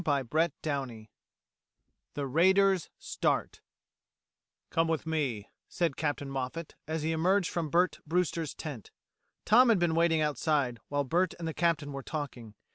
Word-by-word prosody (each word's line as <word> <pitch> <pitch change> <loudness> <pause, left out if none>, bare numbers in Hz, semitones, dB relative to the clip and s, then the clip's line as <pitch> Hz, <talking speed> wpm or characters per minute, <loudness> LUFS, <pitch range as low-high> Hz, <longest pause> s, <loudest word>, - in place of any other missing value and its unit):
CHAPTER 150 +2 +1
TWO 135 -7 -3 1.1
THE 145 - -2
RAIDERS 190 +5 +3
START - - -1 1.1
"Come 165 0 +2
with 160 -1 -1
me," 140 -10 -2 0.2
said 170 -6 0
Captain 145 -2 -2
Moffat, 135 +4 -4
as 160 0 -2
he 160 - 0
emerged 180 +4 +2
from 165 -3 -2
Bert 175 +4 +2
Brewster's 165 -2 -1
tent. 140 - -7 0.6
Tom 240 +4 +6
had 225 - +5
been 175 -2 +1
waiting 165 -1 +3
outside, 145 -4 0
while 145 0 0
Bert 175 +6 +1
and 170 - -5
the 160 - -3
Captain 165 -4 0
were 135 - -5
talking. 130 -7 -6
160 Hz, 140 wpm, -30 LUFS, 140-170 Hz, 1.1 s, Tom